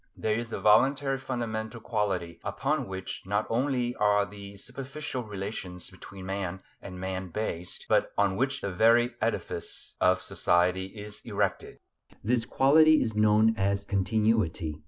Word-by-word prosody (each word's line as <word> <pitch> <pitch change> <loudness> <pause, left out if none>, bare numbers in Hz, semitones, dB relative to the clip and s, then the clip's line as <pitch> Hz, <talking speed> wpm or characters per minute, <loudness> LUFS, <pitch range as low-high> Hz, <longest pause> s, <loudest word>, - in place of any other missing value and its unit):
There 110 - 0
is 115 +1 -3
a - - -3
voluntary 135 +5 +4
fundamental 115 -3 -4
quality 100 -7 -2
upon - - -1
which 95 0 -5
not 105 +3 0
only 125 0 0
are 105 -1 +3
the 100 -1 -10
superficial 135 +3 -5
relations 95 -4 -5
between 95 -1 -11
man 95 -1 -4 0.2
and 90 -2 -8
man 95 0 -4
based, 90 -2 -3
but - - +2
on 100 -2 +2
which 135 +4 0
the 100 - -3
very 115 +5 +4
edifice - - -3
of 90 0 +4
society 90 +1 +1
is 105 +1 -7
erected. - - -2 0.5
This 115 +2 +1
quality 155 +5 +5
is 110 -2 -1
known 110 +1 +4
as 100 +1 0
"continuity." 100 -6 0
105 Hz, 140 wpm, -28 LUFS, 95-120 Hz, 0.5 s, quality